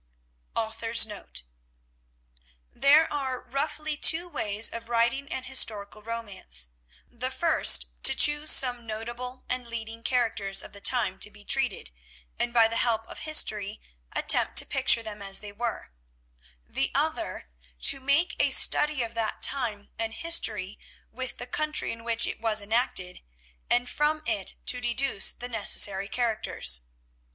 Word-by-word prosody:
_ - - 0
AUTHOR'S 225 +1 +2
NOTE 210 - -8 1.3
There 295 +3 +4
are, 265 -3 -3
roughly, 300 +4 -4
two 335 +3 +4
ways 215 -9 0
of 230 0 -7
writing 235 +4 0
an 260 - -4
historical 215 -5 0
romance—the 65 - -6
first 65 -2 +3 0.2
to - - +5
choose 295 0 +5
some 245 -3 +3
notable 240 +4 -6
and 250 -1 -4
leading 225 -1 -6
characters 225 -6 0
of - - -12
the 200 - -9
time 200 -5 +3
to 210 - +1
be 205 -1 -18
treated, 260 - 0 0.5
and 240 - -1
by 230 -2 +5
the 230 +1 -3
help 225 -2 +1
of - - -8
history 215 -9 0 0.3
attempt - - +2
to - - +7
picture 230 - +3
them 215 -2 -8
as 195 -1 -1
they 210 -1 -7
were; 230 - -5 0.7
the - - 0
other, 60 - -3 0.3
to 275 - +4
make 280 +6 0
a - - +3
study 295 -4 +5
of 230 0 -7
that 225 -2 -3
time 220 -7 -1
and 225 0 -3
history 215 - 0 0.3
with 255 +1 -6
the 245 - -7
country 305 +4 -1
in 230 0 -9
which 230 0 +1
it - - -5
was 220 -2 0
enacted, 205 -4 -1 0.5
and 245 0 +1
from 305 +3 -1
it 210 -7 0
to 250 - +2
deduce 240 -2 +2
the 245 - -8
necessary 200 -3 +3
characters. 215 - -1
230 Hz, 145 wpm, -26 LUFS, 210-255 Hz, 1.3 s, to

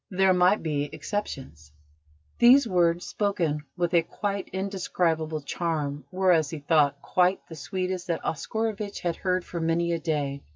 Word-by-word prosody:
There 190 0 +3
might 180 +2 +3
be 145 -2 -1
exceptions." 135 - -5 0.7
These 250 +2 +7
words, 175 -3 +2
spoken 170 -8 -1
with 175 -1 0
a 170 - +6
quite 200 +3 -4
indescribable 175 -5 -1
charm, 150 -2 -3
were, 185 0 +3
as 160 -4 +3
he 160 - -5
thought, 145 -1 +2
quite 185 +1 +2
the 165 - -8
sweetest 185 +3 -3
that 170 -2 -2
Oscarovitch 210 +6 -3
had 170 -2 -1
heard 185 -1 -1
for 170 - -5
many 165 +1 +1
a 170 - 0
day. 145 -4 -2
170 Hz, 155 wpm, -26 LUFS, 155-190 Hz, 0.7 s, These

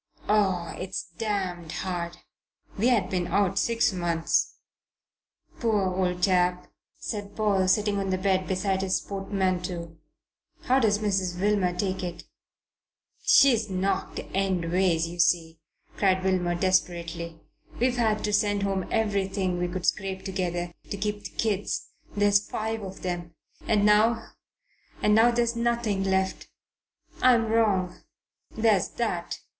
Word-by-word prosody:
Oh, 190 -5 +1
it's 185 +1 -4 0.2
damned 185 -6 -2
hard! 175 -2 -4 0.6
We 220 +5 +1
had 215 -7 +2
been 180 -2 -1
out 195 +1 +1
six 230 -3 +2
months." 170 -2 0 1.0
"Poor 205 -5 +1
old 180 -1 -1
chap!" 180 -2 +1 0.2
said 205 -2 -5
Paul, 200 -3 +2
sitting 205 +1 +2
on 195 -1 -2
the 185 - +1
bed 185 -1 +1
beside 190 0 0
his 190 -1 +1
portmanteau. 185 -4 -3 0.7
"How 260 +1 +3
does 215 -4 +3
Mrs. 190 -4 -1
Wilmer 195 -3 +1
take 190 0 -1
it?" 175 -1 -5 1.0
"She's 230 -6 +5
knocked 190 0 -1 0.2
endways. 180 -3 +1
You 175 +1 -9
see," 165 -2 +2 0.4
cried 190 -2 +2
Wilmer 180 -2 +1
desperately, 170 -2 -1 0.4
"we've 245 +1 +1
had 220 -3 +1
to 210 - -1
send 205 -1 +2
home 195 -2 -1
everything 195 -4 0
we 180 - 0
could 180 0 -4
scrape 190 -1 -1
together 175 -2 -2 0.2
to 200 - -4
keep 210 +1 -3
the - - -4
kids 205 -3 -1 0.3
there's 205 0 +3
five 220 0 -3
of 195 -1 -8
them; 175 -2 -4 0.3
and 210 -2 +3
now 220 +2 +3 0.7
and 210 - +3
now 225 +2 +6
there's 235 0 +1
nothing 235 -4 0
left. 190 0 0 0.7
I'm 235 -3 +4
wrong. 200 -6 +1 0.5
There's 220 -4 +3
that." 180 -8 -2
190 Hz, 130 wpm, -26 LUFS, 180-210 Hz, 1.0 s, now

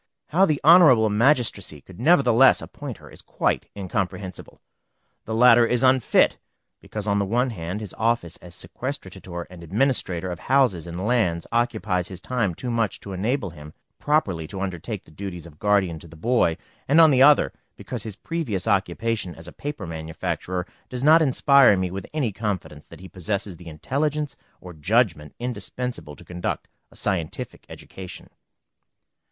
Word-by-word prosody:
How 190 +5 +4
the 150 -3 +1
Honorable 150 - +7
Magistracy 110 - +1
could 95 +5 -15
nevertheless 135 -3 +5
again - - -6
appoint - - -7
her - - -15
is - - -14
quite - - -1
incomprehensible. 95 -1 -4 0.7
The 110 - -3
latter 120 0 +7
is 125 +2 +1
unfit; 130 -2 +3 0.4
because, 105 -1 -6
on 100 -1 +1
the 100 - +1
one 120 +5 0
hand, 90 +1 -5
his 105 - -7
office 110 -7 0
as 90 -1 -12
sequestrator 95 -4 -7
and 90 -2 -11
administrator 95 - 0
of 85 - -6
houses 125 - +2
and 85 +3 -5
lands, 105 -9 +1
occupies 110 -6 0
his 95 -2 -8
time 105 -5 -1
too 125 +6 -4
much 115 -3 -1
to 100 - -8
enable 100 +1 -1
him 75 -2 -12 0.2
properly 100 - 0
to 95 +2 -7
undertake 95 -4 -4
the - - -18
duties 90 0 -7
of 75 -3 -15
guardian 100 -5 +1
to 85 - -13
the 80 - -14
boy; 85 -2 +1 0.3
and, 145 +4 +5
on 160 -2 +8
the 130 -1 +4
other, 145 +1 +6 0.2
because - - -6
his 110 -4 -6
previous 115 - -3
occupation 100 0 0
as 80 +1 -11
a - - -9
paper 145 -9 -6
manufacturer, 80 +2 -4 0.2
does 125 0 -5
not 160 +3 +7
inspire 140 -5 +5
me 95 -1 -1
with 95 0 -6
any 145 -8 -1
confidence 95 -8 -5
that - - -13
he 95 - -9
possesses 95 +1 -3
the 85 +1 -14
intelligence 145 - -2 0.3
or 90 -1 -10
judgment 80 - 0
indispensable 125 - -5
to - - -16
conduct 90 0 -4 0.2
a - - -20
scientific 85 -6 -4
education. 95 -2 -10
100 Hz, 165 wpm, -24 LUFS, 90-125 Hz, 0.7 s, on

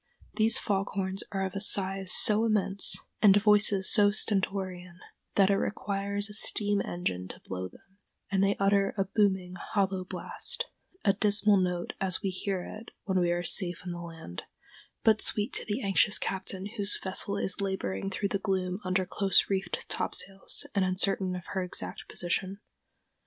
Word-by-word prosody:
These 220 0 +3
fog 195 -1 -1
horns 190 0 -2
are 195 -1 -2
of 190 - -5
a 195 - -4
size 195 -2 +1
so 215 +1 +4
immense, 200 -3 +2 0.2
and 205 -2 +7
voices 205 -2 +4
so 205 -1 +6
stentorian, 190 -4 -2 0.4
that 195 0 +4
it 195 - +2
requires 200 0 -1
a 210 - -11
steam 205 -1 +1
engine 90 - -4
to - - -8
blow 95 0 -5
them, 195 - -22 0.3
and 195 0 +2
they 200 0 +2
utter 195 +1 +2
a 195 - +2
booming, 190 -3 0
hollow 190 0 -2
blast, 185 - -1 0.4
a 200 - +4
dismal 210 0 +3
note 180 -2 -2
as 185 -1 +1
we 195 - -1
hear 185 0 -3
it 220 +5 -10
when 190 -2 0
we 175 -1 +1
are 175 0 -1
safe 175 0 0
on 180 - -4
the 175 0 -6
land, 165 - -9 0.6
but 220 -1 +4
sweet 210 +1 +2
to - - +1
the 220 +4 -3
anxious 200 +1 +4
captain 190 0 -4
whose 205 -1 +3
vessel 200 +1 +1
is 195 0 0
laboring 190 - -3
through 200 +1 -3
the 200 - -1
gloom 185 -2 -2
under 185 0 0
close 195 +2 +2
reefed 190 -2 -2
topsails, 195 0 +1
and 200 - +1
uncertain 185 0 +1
of 180 0 -8
her 190 -1 -2
exact 180 - -4
position. 190 +3 -2
195 Hz, 170 wpm, -28 LUFS, 185-200 Hz, 0.6 s, and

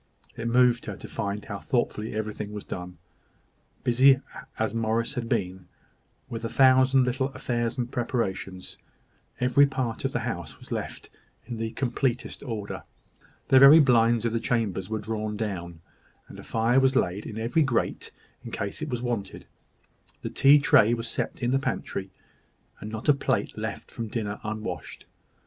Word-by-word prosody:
It 115 - -4
moved 120 0 +3
her - - -4
to - - -9
find 100 +1 -4
how 100 -1 -5
thoughtfully 110 -3 -1
everything 105 -1 -4
was 105 - -6
done. 90 -1 -7 0.9
Busy 130 +2 +5 0.4
as 110 +1 -1
Morris 115 +1 0
had 120 -4 -4
been 90 -1 -2 0.6
with 115 0 -6
a 115 - -2
thousand 130 0 +5
little 130 +2 0
affairs 120 0 -2
and 125 -1 -2
preparations, 95 -6 -3 0.6
every 125 +3 +5
part 130 -4 -3
of - - 0
the - - -2
house - - -5
was - - -16
left - - -5 0.3
in 120 -2 -6
the 115 0 -2
completest 125 0 -2
order. 110 -6 -5 0.7
The 130 - +7
very 140 +4 +10
blinds 120 -4 +4
of 115 - +1
the 115 - 0
chambers 110 -6 -1
were 110 - -1
drawn 110 0 -3
down, 85 -6 -4 0.5
and - - -11
a - - -9
fire 115 +3 +2
was 135 0 +3
laid 100 -2 0
in 110 - -7
every 115 +8 +1
grate, 130 -5 0 0.3
in - - -7
case 100 +6 -4
of 155 -3 -4
its 120 -1 -2
being 125 - -2
wanted. 105 -5 -5 0.8
The - - -4
tea 140 +2 +6
tray 120 -5 +5
was 115 0 -5
set - - -4
in 120 - +1
the 135 - +3
pantry, 95 -7 -3 0.7
and 105 - -7
not 110 +4 -6
a 145 - +7
plate 140 - -1
left - - -5
from 115 - -5
dinner 105 -2 -3
unwashed. 110 0 -5
115 Hz, 170 wpm, -26 LUFS, 105-125 Hz, 0.9 s, very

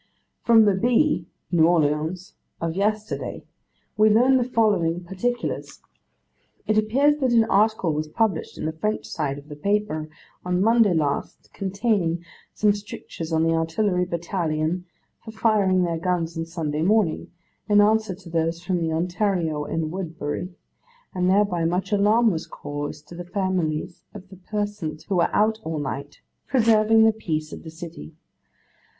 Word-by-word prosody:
From 225 -2 +6
the 205 - +4
Bee 235 - +2 0.2
(New 165 -2 +5
Orleans) 160 +2 0 0.3
of 165 -1 -2
yesterday, 215 +2 -2 0.5
we 215 0 +5
learn 250 +5 +5
the 250 - +2
following 200 -8 +1
particulars. 240 +7 -3 0.9
It 215 - +1
appears 265 +8 +3
that 260 -3 +1
an 230 -1 +6
article 210 -5 +2
was 155 +1 -2
published 220 +6 -1
in - - -4
the 160 - 0
French 210 +7 -2
side 140 -3 -3
of 145 +1 -12
the 150 - -8
paper 155 -3 -1 0.3
on 180 0 0
Monday 220 -2 +4
last, 145 -3 -2
containing 190 -4 -1 0.3
some 210 -1 +3
strictures 200 -5 -7
on 160 0 +2
the 165 0 +2
Artillery 180 +3 0
Battalion 170 -1 -2 0.4
for - - -10
firing 210 -4 +2
their 170 -2 -1
guns 170 -1 -1
on 165 0 -3
Sunday 155 -3 -3
morning, 195 -2 +1 0.4
in 205 0 +5
answer 215 -1 +3
to 180 -2 -14
those 165 0 0
from 175 0 -2
the 165 -1 -1
Ontario 170 -2 -1
and 160 0 -2
Woodbury, 165 -2 -4 0.6
and 180 0 +1
thereby 190 -3 +2
much 180 +4 -1
alarm 210 +3 +4
was 160 -2 -4
caused 145 +1 -6
to - - -10
the 175 - -6
families 180 -4 -2
of 195 -2 -10
those 190 - -13
persons 205 -7 -3
who 195 - -1
were 170 - +3
out 220 +1 +2
all 160 0 -3
night 140 0 -5 0.3
preserving 225 -3 +4
the 220 0 +5
peace 155 -8 -3
of - - -8
the 160 - -9
city. 160 - -10
180 Hz, 155 wpm, -24 LUFS, 160-215 Hz, 0.9 s, From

